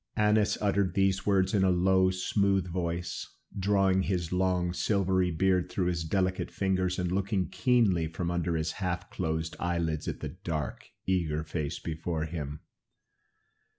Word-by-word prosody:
Annas 105 0 +3
uttered 100 -2 +1
these 95 0 +1
words 95 0 +3
in 100 -2 +3
a 95 - +4
low, 95 +1 +4
smooth 95 0 +1
voice, 85 -1 -4 0.2
drawing 95 -1 +2
his 90 -3 -1
long 90 -1 +1
silvery 95 0 +1
beard 90 +2 +1
through 95 - -1
his 85 -2 -1
delicate 95 +3 0
fingers 95 -2 0
and 90 -1 -1
looking 95 -2 0
keenly 105 -8 +2
from 85 +2 -3
under 85 -1 0
his 80 0 -1
half 90 -1 -3
closed 80 -2 -2
eyelids 85 -3 -1
at - - -3
the - - -4
dark, 75 -6 -5 0.2
eager 80 -5 0
face 80 0 -3
before 80 0 -3
him. 75 -2 -5
90 Hz, 150 wpm, -29 LUFS, 85-95 Hz, 0.2 s, a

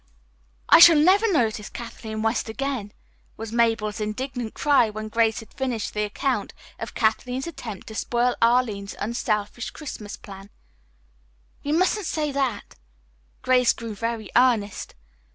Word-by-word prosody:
"I - - +8
shall 335 -1 +10
never 390 +8 +4
notice 225 - 0
Kathleen 220 -2 -6
West 225 0 0
again!" 250 -3 -3 0.5
was 225 -1 -6
Mabel's 225 -2 +1
indignant 240 +2 -4
cry 285 -6 +3
when 215 0 -6
Grace 225 0 +1
had 225 - -16
finished 250 -5 -3
the 210 - -1
account 250 +5 -2 0.2
of - - -7
Kathleen's 250 +4 0
attempt 235 - -7
to 220 - -9
spoil 240 +2 0
Arline's 230 -4 +1
unselfish 210 +1 -2
Christmas 215 -9 -8
plan. 195 0 -12 1.1
"You 290 +2 -1
mustn't 370 +1 +1
say 300 -2 -1
that." 270 -6 -2 0.7
Grace 250 -1 +4
grew 230 -2 -7
very 225 -1 -4
earnest. 235 -5 +2
230 Hz, 135 wpm, -24 LUFS, 215-260 Hz, 1.1 s, shall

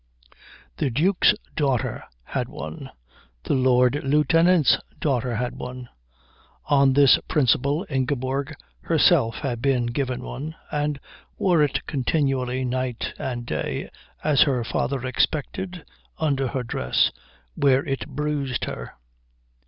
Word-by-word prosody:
The - - 0
Duke's 180 - +3 0.2
daughter 135 -6 0 0.2
had 125 - -3
one. 145 -1 -7 0.5
The - - -1
Lord 130 +1 +3
Lieutenant's 150 +3 +4 0.2
daughter 125 -4 0
had 125 +2 -2
one. 125 -1 -7 0.8
On 140 -2 +4
this 140 -1 +6
principle 145 - +2
Ingeborg 135 +1 -2 0.3
herself 115 - +3
had 120 -4 -2
been 130 -2 +2
given 125 +1 -2
one, 155 +6 -6 0.2
and 150 -1 -1 0.4
wore 175 -5 +3
it 140 -3 0
continually 130 -2 0
night 125 -1 -2
and 120 -2 -4
day, - - -3 0.3
as 150 -2 +3
her 130 -4 +3
father 130 +2 -2
expected, 165 +7 -2 0.3
under 140 -4 0
her 130 0 -3
dress, 65 - +1 0.4
where 135 - +3
it 135 0 -3
bruised 145 -3 -2
her. - - -7
135 Hz, 115 wpm, -24 LUFS, 125-150 Hz, 0.8 s, this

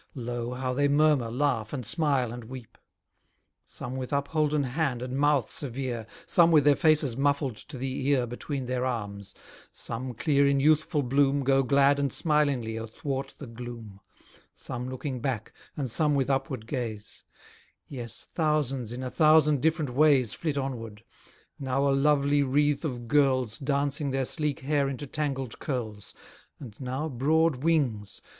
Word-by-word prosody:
Lo! 120 -1 -4
how 130 0 -2
they 145 +2 +2
murmur, 145 -4 +3
laugh, 120 -3 -1
and 130 -5 -4
smile, 140 -4 +1
and 120 -1 -8
weep: 125 -1 -10 0.9
Some 130 - -7
with 130 -1 -5
upholden 150 +1 +1
hand 130 -2 -1
and 125 0 -4
mouth 145 -1 +2
severe; 125 -4 -4 0.2
Some 170 -1 +5
with 155 -3 +6
their 145 0 +5
faces 150 -6 +3
muffled 140 -2 0
to 150 -3 -10
the 130 +1 -3
ear 135 -4 +3
Between 130 +3 -5
their 125 0 -2
arms; 100 -6 -4 0.4
some, 125 +1 -4
clear 140 +2 +3
in 140 0 +3
youthful 155 +1 +2
bloom, 140 +2 +2
Go 135 +1 +3
glad 140 +2 +3
and 140 -2 0
smilingly, 140 -8 +1
athwart 135 +5 -5
the 145 - -8
gloom; 115 -4 -9 0.5
Some 125 0 -5
looking 130 0 -4
back, 120 -4 -3 0.2
and 140 -3 -2
some 150 +5 +1
with 140 0 +1
upward 135 -4 -2
gaze; 115 -4 -5 0.6
Yes, 120 -4 -8
thousands 145 -7 0
in 125 +2 -5
a 125 - -4
thousand 155 -3 +4
different 155 -3 +1
ways 135 -5 +4
Flit 155 -4 -3
onward 115 -6 -5 0.6
now 135 +1 0
a 140 - +3
lovely 145 0 +3
wreath 145 +2 +1
of 125 -6 -4
girls 130 -5 +2
Dancing 140 +1 0
their 135 0 0
sleek 150 -1 -1
hair 140 0 +1
into 135 +2 -5
tangled 135 -4 -3
curls; 110 -7 -5 0.4
And 120 -8 -10
now 130 +4 -3
broad 155 +3 +2
wings. 130 -9 0
135 Hz, 155 wpm, -27 LUFS, 125-145 Hz, 0.9 s, with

